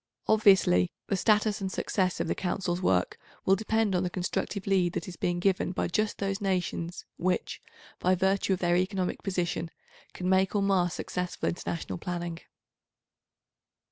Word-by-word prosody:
Obviously, 190 - +5 0.2
the 200 - +2
status 210 +1 +2
and 190 -1 -2
success 185 -2 0
of - - -1
the - - +1
Council's 180 -1 -2
work 90 - +1 0.3
will 190 - +5
depend 220 0 +1
on 180 - +2
the 180 - -1
constructive 185 +2 -3
lead 185 -3 +2
that - - -3
is 180 - -7
being 175 +1 -1
given 185 0 +1
by - - -1
just 215 +4 0
those 195 +1 -2
nations 180 -3 -2
which, 180 +1 -1 0.4
by 185 +1 +3
virtue 190 +1 +2
of - - 0
their 175 -1 +3
economic 185 0 -1
position, 175 -3 -2 0.5
can 180 - -3
make 190 +1 +3
or 200 - +2
mar 190 -3 +3
successful 180 +2 -3
international 170 0 -4
planning. 175 -1 -4
185 Hz, 160 wpm, -29 LUFS, 175-195 Hz, 0.5 s, Obviously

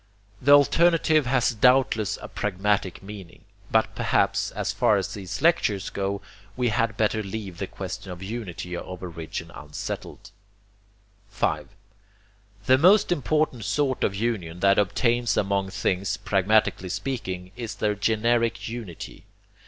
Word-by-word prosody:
The 140 +3 +6
alternative 155 0 +4
has 125 -1 +2
doubtless 120 -2 +3
a - - -5
pragmatic 100 -1 -1
meaning, 95 -3 -10 0.3
but - - +2
perhaps, - - +1
as - - -2
far - - +3
as - - -3
these 100 - -6
lectures 105 - +2
go, 100 0 -2 0.4
we 125 -1 +1
had 110 -1 0
better 110 0 +1
leave 100 -3 -6
the 95 - -3
question 95 0 -7
of 90 +1 -8
unity 95 -5 -5
of 90 +1 -7
origin 85 -1 -6
unsettled. 75 +5 -7 1.0
5. - - -1 1.0
The 130 +1 +5
most 190 +5 +5
important 150 -5 0
sort 140 0 0
of 100 - +1
union 95 -6 -2
that 100 0 +5
obtains 120 +4 +1
among 100 -1 0
things, 95 0 -1
pragmatically 100 -1 +1
speaking, 95 -6 -4
is 120 -3 -5
their 105 -1 0
GENERIC 115 +3 +1
UNITY. 115 -7 -8
105 Hz, 130 wpm, -25 LUFS, 95-120 Hz, 1.0 s, The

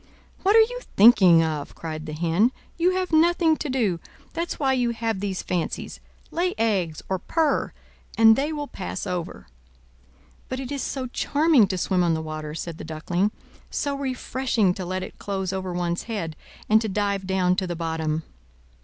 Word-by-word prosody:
"What 400 +3 +3
are 450 - +9
you - - 0 0.2
thinking 190 -6 +7
of?" 155 -3 -3
cried 155 -1 -6
the 155 - -5
Hen. 170 +9 +2 0.2
"You 360 +2 +2
have 370 -1 -1
nothing 325 0 +4
to 295 - -4
do, 220 -10 0 0.3
that's 335 +1 -3
why 270 -2 +2
you 245 -2 +1
have 225 -3 -2
these 195 -2 -3
fancies. 175 -2 -3 0.3
Lay 360 +2 0
eggs, 195 -8 0
or 190 -1 -1
purr, 315 - 0 0.5
and 225 0 +8
they 285 +5 -1
will 295 -2 -4
pass 90 - -5
over." 170 - -4 1.0
"But 260 - -3
it 265 -1 -6
is 280 -2 -2
so 265 -2 -3
charming 285 -1 +3
to 190 - -2
swim 180 0 +1
on 170 -2 +2
the 160 - -2
water!" 155 -1 -5
said 165 0 -6
the - - -6
Duckling, 175 +5 -1 0.4
"so 285 -2 -1
refreshing 255 -6 0
to 185 0 -5
let 185 +1 -3
it - - -10
close 190 -2 -3
over 190 -1 -3
one's 175 -1 -1
head, 170 -8 -3 0.3
and 220 +1 +5
to 220 - -2
dive 200 -1 -1
down 185 -1 +2
to 190 - 0
the 175 - -3
bottom." 160 -1 -2
195 Hz, 180 wpm, -24 LUFS, 170-265 Hz, 1.0 s, are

